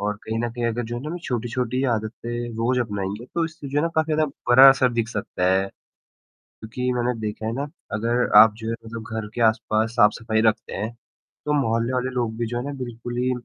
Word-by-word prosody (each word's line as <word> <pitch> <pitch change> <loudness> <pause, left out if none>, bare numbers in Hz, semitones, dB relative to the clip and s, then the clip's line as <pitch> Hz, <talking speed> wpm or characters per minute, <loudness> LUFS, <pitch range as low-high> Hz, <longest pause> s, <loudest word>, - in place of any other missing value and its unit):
और 105 +1 -1
कहीं 110 +1 -2
न 120 - -2
कहीं 120 0 -4
अगर 120 +1 -1
जो 120 - -4
है - - -8
ना 175 - -4
छोटी-छोटी 125 +1 -2
आदतें 110 +2 -5 0.3
रोज़ 125 +2 +1
अपनाएँगे 105 -1 -3
तो 170 - +1
इससे 155 -3 -7
जो 140 +2 0
है - - +2
ना 165 - +1
काफ़ी 160 -1 +2
ज़्यादा 155 0 +2 0.2
बड़ा 130 +2 +10
असर 130 -2 +2
दिख 115 -1 -1
सकता 105 -4 -3
है, 95 +1 +2 0.8
क्योंकि 125 +3 -5
मैंने 125 0 0
देखा 105 0 -4
है - - -1
ना 140 +4 -2 0.3
अगर 115 +3 +1
आप 110 -1 +8
जो 110 0 -5
है 115 - -1
मतलब 115 0 -7 0.2
घर 110 - -5
के 120 - -2
आसपास 110 0 -1
साफ़-सफ़ाई 110 -1 +3
रखते 110 +1 0
हैं, 110 +3 -3 0.5
तो 150 - +1
मोहल्ले 115 +1 0
वाले 130 0 0
लोग 120 -3 -2
भी 120 - -1
जो 120 +1 -3
है 120 - -2
ना 145 - -4
बिल्कुल 120 0 -6
ही, 125 +1 +1
120 Hz, 225 wpm, -23 LUFS, 110-125 Hz, 0.8 s, बड़ा